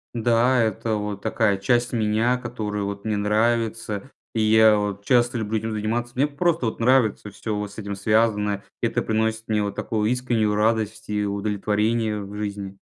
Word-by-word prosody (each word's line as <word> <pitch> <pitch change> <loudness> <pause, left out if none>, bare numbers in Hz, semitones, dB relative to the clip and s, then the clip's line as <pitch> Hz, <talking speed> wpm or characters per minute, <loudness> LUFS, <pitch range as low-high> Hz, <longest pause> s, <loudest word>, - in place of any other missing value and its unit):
Да, 120 +2 +3
это 110 0 0
вот 105 -1 -4
такая 105 -3 +1
часть 120 +4 +1
меня, 115 +3 +2
которую 110 -5 -4
вот 100 +1 -6
мне 110 -1 0
нравится, 110 +2 0 0.2
и 110 - 0
я 110 0 +6
вот 100 -1 -3
часто 120 +1 +3
люблю 110 0 -1
этим 110 +1 -4
заниматься, 115 +3 -2
мне 135 - +3
просто 150 -2 0
вот 110 - -3
нравится 115 -4 +2
всё 105 +1 -4
вот 105 -1 -4
с - - -15
этим 100 -1 -4
связаное. 105 0 +1 0.2
Это - - 0
приносит 110 0 -1
мне 105 -1 +1
вот 100 -1 -3
такую 110 -1 -1
искреннюю 120 -4 +1
радость 110 0 0
и 105 0 0
удовлетворение 105 +2 0
в 100 +1 -9
жизни. 100 -2 -5
110 Hz, 170 wpm, -23 LUFS, 105-115 Hz, 0.2 s, я